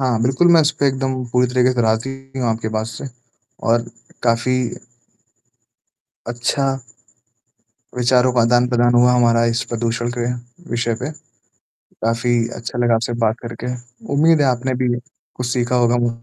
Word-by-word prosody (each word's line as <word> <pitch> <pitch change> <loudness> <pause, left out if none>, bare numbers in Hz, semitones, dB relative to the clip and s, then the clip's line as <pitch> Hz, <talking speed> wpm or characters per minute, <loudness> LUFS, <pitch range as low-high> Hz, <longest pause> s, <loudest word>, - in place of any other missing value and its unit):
हाँ, 125 -4 +1
बिल्कुल 130 +8 +3
मैं 165 - +7
उस 150 - +3
पे 140 - +4
एकदम 130 0 -1 0.2
पूरी 125 0 +3
तरीके 125 +1 +2
से 125 -1 0
राज़ी 110 +3 +1 0.3
हूँ 120 - +1
आपके 110 0 -2
बात 110 0 -1
से 115 +2 -8 0.6
और 115 +1 +3 0.4
काफ़ी 120 +2 +2 1.7
अच्छा। 120 +3 0 1.3
विचारों 125 +1 +3
का 125 - +2
आदान-प्रदान 120 +1 +3
हुआ 125 +1 +5
हमारा 115 -1 +3
इस 115 0 0
प्रदूषण 120 0 -1
के 120 0 -1 0.4
विषय 120 -1 0
पे। 140 - -2 1.0
काफ़ी 115 +1 +1 0.2
अच्छा 120 - -6
लगा 120 -1 +3
आपसे 115 +1 -1
बात 110 0 +1
करके, 120 +2 -5 0.4
उम्मीद 155 +2 +4
है 140 - +3
आपने 130 +1 0
भी 125 - +2 0.5
कुछ 125 - -3
सीखा 125 0 0
होगा 120 0 +3
मु - - +1
120 Hz, 150 wpm, -19 LUFS, 115-125 Hz, 1.7 s, मैं